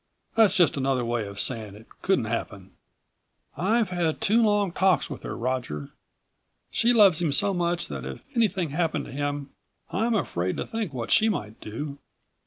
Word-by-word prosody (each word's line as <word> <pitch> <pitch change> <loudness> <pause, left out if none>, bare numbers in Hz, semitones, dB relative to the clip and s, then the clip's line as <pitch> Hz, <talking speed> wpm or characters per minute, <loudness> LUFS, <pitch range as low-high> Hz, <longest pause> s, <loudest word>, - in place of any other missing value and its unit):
That's 215 -4 +4
just 175 -6 +4
another 135 -2 +1
way 120 -3 -1
of 100 0 -8
saying 110 -4 -1
it 110 +2 -14 0.2
couldn't 190 -12 +2
happen." 100 -4 -4 0.8
"I've 215 +3 +1
had 175 -3 -1
two 225 +4 +3
long 205 -4 +2
talks 185 -2 +2
with 140 - -6
her, - - -5
Roger. 115 - -3 0.8
She 235 - +3
loves 200 -8 +6
him 165 -4 +1
so 200 +8 +2
much 175 -1 0
that - - -6
if - - -6 0.2
anything 190 -9 +1
happened 165 +1 0
to - - -10
him 145 0 -3 0.4
I'm 225 +5 +1
afraid 90 - -1
to - - -2
think 225 -7 -3
what 120 -4 -4
she 220 - +5
might 110 - -4
do. 140 +6 -6
160 Hz, 175 wpm, -26 LUFS, 120-195 Hz, 0.8 s, loves